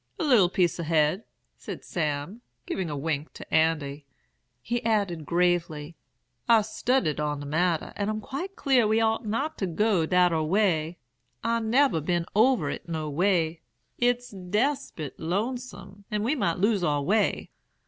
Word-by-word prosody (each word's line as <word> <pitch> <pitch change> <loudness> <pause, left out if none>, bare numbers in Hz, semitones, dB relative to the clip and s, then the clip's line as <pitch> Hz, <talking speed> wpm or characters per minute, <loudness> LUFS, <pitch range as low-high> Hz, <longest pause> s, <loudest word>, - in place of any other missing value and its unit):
"'A - - -2
little 240 - +5
piece 180 -1 +1
ahed,' 160 +4 +1 0.3
said - - -8
Sam, 155 +6 -3 0.2
giving 185 -4 -3
a 145 - -4
wink 150 +1 -3
to - - -11
Andy. 150 -3 +1 0.5
He 235 - -3
added 200 -8 0
gravely, 170 -3 0 0.5
'I've 225 -3 +6
studded 220 - 0
on 150 -1 -1
de 145 - -7
matter, 165 +2 0
and 205 0 -2
I'm 215 0 -2
quite 290 - -6
clar 255 -5 +3
we 220 +1 +3
ought 225 0 +1
not 275 +9 -2
to 195 - 0
go 180 -1 +1
dat 180 -1 +4
ar 160 -1 +1
way. 170 -2 +1 0.5
I 230 0 +1
nebber 230 - +2
been 175 +2 0
over 245 +4 +4
it 175 - -7
no 155 -2 -3
way. 165 -1 +1 0.4
It's 245 0 +1
despit 195 - -2
lonesome, 200 +1 -4
and 210 -2 -1
we 245 +6 +1
might 170 - 0
lose 200 0 +2
our 145 -3 +1
way. 210 +7 +1
180 Hz, 160 wpm, -27 LUFS, 160-225 Hz, 0.5 s, I've